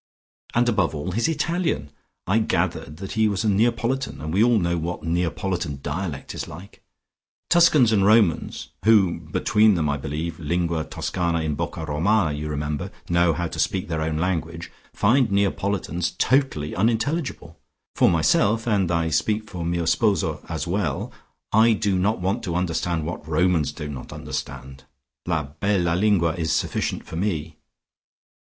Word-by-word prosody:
And 120 +1 +3
above 100 -9 +1
all, 75 +5 -3
his 115 - +1
Italian! 165 - -1 0.3
I 100 +5 +2
gathered 75 -7 -1
that 95 +2 -7
he 110 0 +2
was 100 +1 -1
a 110 - +2
Neapolitan, 120 +5 0
and 80 +1 -5
we 100 +4 +4
all 120 -1 +4
know 85 -3 +1
what 85 +1 -4
Neapolitan 85 -2 -1
dialect 75 -1 -4
is - - -5
like. 90 +6 -11 0.7
Tuscans 155 -9 +5
and 100 -3 +3
Romans, 105 -5 +2
who 100 -6 +4
between 105 +6 +2
them 80 -3 0
I 70 0 0
believe 80 +4 -4
Lingua 85 0 -1
Toscano 85 +2 -2
in 80 -2 -1
Bocca 80 +2 -4
Romana, 80 +2 +1
you 75 +1 -4
remember 75 0 -3 0.2
know 85 -1 +3
how 85 +2 -2
to - - -7
speak 95 -2 0
their 80 -2 -1
own 80 0 -1
tongue, 85 -1 -2 0.3
find 120 +4 +3
Neapolitans 100 -3 -1
totally 130 - +1
unintelligible. 120 - -1 0.4
For - - +5
myself, 100 +7 +2
and 100 -6 +1
I 85 -1 +1
speak 105 +7 0
for 90 -4 -6
mio 85 0 -1
sposo 100 +5 +1
as 80 -2 -3
well, 85 -5 -2 0.4
I 110 +2 +5
do 100 -2 0
not 105 +4 +1
want 95 +6 -1
to 85 -3 -2
understand 85 -2 -1
what 80 -2 -6
Romans 80 -1 +2
do 75 - -7
not 70 -4 -7
understand. 65 -1 -6 0.4
La 80 -3 0
bella 85 +4 0
lingua 90 -3 +2
is 80 -2 -2
sufficient - - -1
for 80 - -7
me." 80 -5 -2
90 Hz, 155 wpm, -23 LUFS, 80-105 Hz, 0.7 s, Tuscans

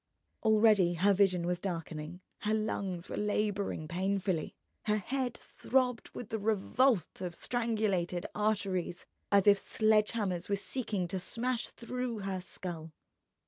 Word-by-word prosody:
Already 215 -5 +5
her 200 +4 +4
vision 185 -3 +3
was 175 0 0
darkening, 165 -2 -5 0.2
her 215 +1 +1
lungs 195 -5 -2
were - - -5
labouring 205 -5 -1
painfully, 185 -1 -1 0.3
her 210 0 +2
head 250 +3 -2
throbbed 250 -2 0
with 235 - -8
the 220 - -2
revolt 215 - +2
of 175 -2 -4
strangulated 210 -8 0
arteries 195 -4 -1 0.3
as 200 -1 +5
if 200 -1 +7
sledge 215 0 +3
hammers 190 -6 -1
were 200 - +3
seeking 205 -3 -2
to 190 +2 -2
smash 240 +6 -1
through 245 -2 -4
her 195 -1 -3
skull. 170 -3 -6
200 Hz, 135 wpm, -32 LUFS, 180-220 Hz, 0.3 s, if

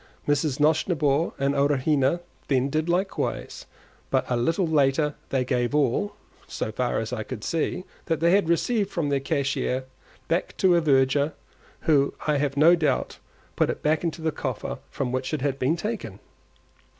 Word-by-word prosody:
Mrs. 145 -1 +1
Nosnibor 155 0 +2
and 140 +1 +1
Arowhena 140 +2 +2 0.3
then 135 0 +1
did 155 +3 0
likewise, 185 +3 -2 0.4
but - - +1
a - - +3
little 165 +10 +1
later 150 -1 +2 0.2
they 130 -2 0
gave 125 +1 0
all 150 - +1 0.3
(so 110 - -4
far 125 +2 -1
as 115 +2 -3
I 115 - -2
could 110 0 -7
see) 165 +2 -1 0.2
that 165 -2 0
they 170 +1 +3
had 195 -3 +3
received 200 +4 +1
from 165 -7 -2
the 140 -1 +1
cashier 135 -3 -1 0.4
back 170 +3 -1
to 185 -2 +4
a 170 - +3
verger, 140 0 +3 0.5
who 140 -3 +2
I 150 -1 +2
have 140 -1 -1
no 165 +4 +7
doubt 150 -6 -1 0.4
put - - +2
it - - -4
back 155 +2 +2
into 165 -1 -3
the 160 - +1
coffer 130 -6 -4
from 130 -3 -3
which 130 +4 -1
it 145 - -5
had 140 -1 -1
been 135 +6 +2
taken. 175 - -4
145 Hz, 170 wpm, -25 LUFS, 135-165 Hz, 0.5 s, no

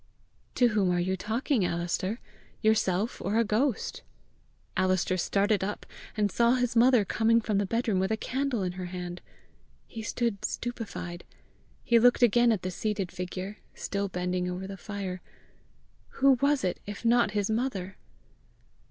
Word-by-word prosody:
"To 245 -1 +4
whom 205 -4 +2
are 175 0 +2
you 185 +2 0
talking, 225 - 0
Alister? 175 +5 -1 0.4
yourself 215 -1 +1
or 200 +4 0
a 230 - +5
ghost?" 230 +3 0 0.7
Alister 185 0 +2
started 200 +2 +1
up, 205 +2 -4 0.3
and 205 -2 +2
saw 235 +1 +3
his 245 -2 0
mother 240 -2 +5
coming 230 +3 +3
from 215 -3 0
the 200 - 0
bedroom 230 -3 0
with 190 - +1
a 220 - 0
candle 260 -3 -1
in 180 - -1
her 180 0 -6
hand! 175 0 -6 0.6
He 225 - -8
stood 220 -1 -2
stupefied. 205 -7 -4 0.6
He 235 -1 +4
looked 245 +1 +5
again 240 +1 +5
at 210 -5 -1
the 185 - -2
seated 200 -1 -2
figure, 185 +3 -5 0.2
still 200 0 -2
bending 180 0 -1
over 180 +1 -4
the 195 0 -6
fire. 195 -2 -5 1.0
Who 275 0 +6
was 285 -2 +3
it 180 -2 -1
if 205 +3 -7
not 235 -2 +4
his 205 +1 0
mother? 215 -6 -2
205 Hz, 155 wpm, -28 LUFS, 185-235 Hz, 1.0 s, Who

